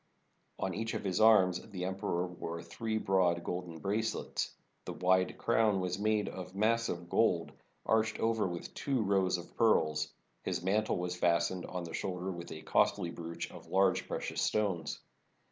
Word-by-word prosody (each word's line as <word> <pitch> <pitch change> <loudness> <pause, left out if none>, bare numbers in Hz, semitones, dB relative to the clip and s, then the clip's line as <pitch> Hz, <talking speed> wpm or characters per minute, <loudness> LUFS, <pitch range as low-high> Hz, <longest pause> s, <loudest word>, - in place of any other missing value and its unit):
On 95 - -2
each 110 +4 -3
of - - -3
his 95 0 0
arms 95 -5 +6
the 90 -3 -4
emperor 95 -2 -1
wore 85 -2 -6
three 110 -1 -3
broad 90 -4 +2
golden 90 -2 -4
bracelets. 105 +7 -2 0.3
The - - -4
wide 95 0 +2
crown 110 -4 +3
was 90 0 -2
made 105 -1 +1
of 90 0 -7
massive 110 -4 +1
gold, 85 -6 +2 0.3
arched 110 0 +2
over 110 -2 +2
with 85 -1 -6
two 135 -5 0
rows 95 -2 +2
of 85 0 -11
pearls. 75 -9 +2 0.3
His - - -2
mantle 105 +3 +1
was 90 0 -2
fastened 85 +1 +1
on 90 -1 -4
the 85 - -7
shoulder 95 -1 -3
with 85 -1 -7
a 80 - -7
costly 85 - +2
brooch 85 0 -6
of - - -12
large 95 -1 +2
precious - - -3
stones. 95 -8 0
95 Hz, 160 wpm, -33 LUFS, 85-105 Hz, 0.3 s, arms